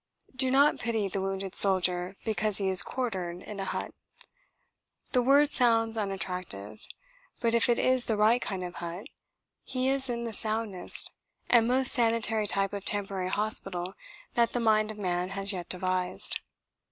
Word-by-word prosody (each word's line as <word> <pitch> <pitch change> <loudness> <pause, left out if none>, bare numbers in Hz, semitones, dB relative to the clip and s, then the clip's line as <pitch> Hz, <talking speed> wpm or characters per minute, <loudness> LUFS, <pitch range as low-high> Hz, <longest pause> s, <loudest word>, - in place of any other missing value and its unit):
Do 260 0 +3
not 280 +3 +3
pity 225 -3 -1
the 195 0 -4
wounded 195 0 -4
soldier 185 -1 +4
because 215 -2 -1
he 195 -2 -1
is 185 -1 +5
quartered 185 -7 -4
in 205 -1 -8
a 195 - -3
"hut." - - -5 1.2
The 250 - +4
word 280 +4 +3
sounds 225 -2 +2
unattractive. 180 - -5 0.6
But 230 -1 0
if 235 +1 +2
it 240 - +3
is 255 -1 +1
the 220 - -1
right 220 +4 +3
kind 190 -2 -4
of 175 -1 -6
hut, 175 +5 -7 0.6
he 255 0 -2
is 270 -1 0
in 235 -1 -3
the 230 -1 -5
soundest 215 -3 +3 0.4
and 230 -2 +5
most 260 +1 +3
sanitary 225 -3 +1
type 195 0 +1
of 200 -1 -5
temporary 195 -3 -2
hospital 195 -3 -3 0.4
that 235 -1 +1
the 245 - -1
mind 215 -2 +2
of 215 - -7
man 180 -2 -2
has 195 +1 +1
yet 180 -2 -7
devised. 185 0 -2
210 Hz, 165 wpm, -28 LUFS, 185-235 Hz, 1.2 s, is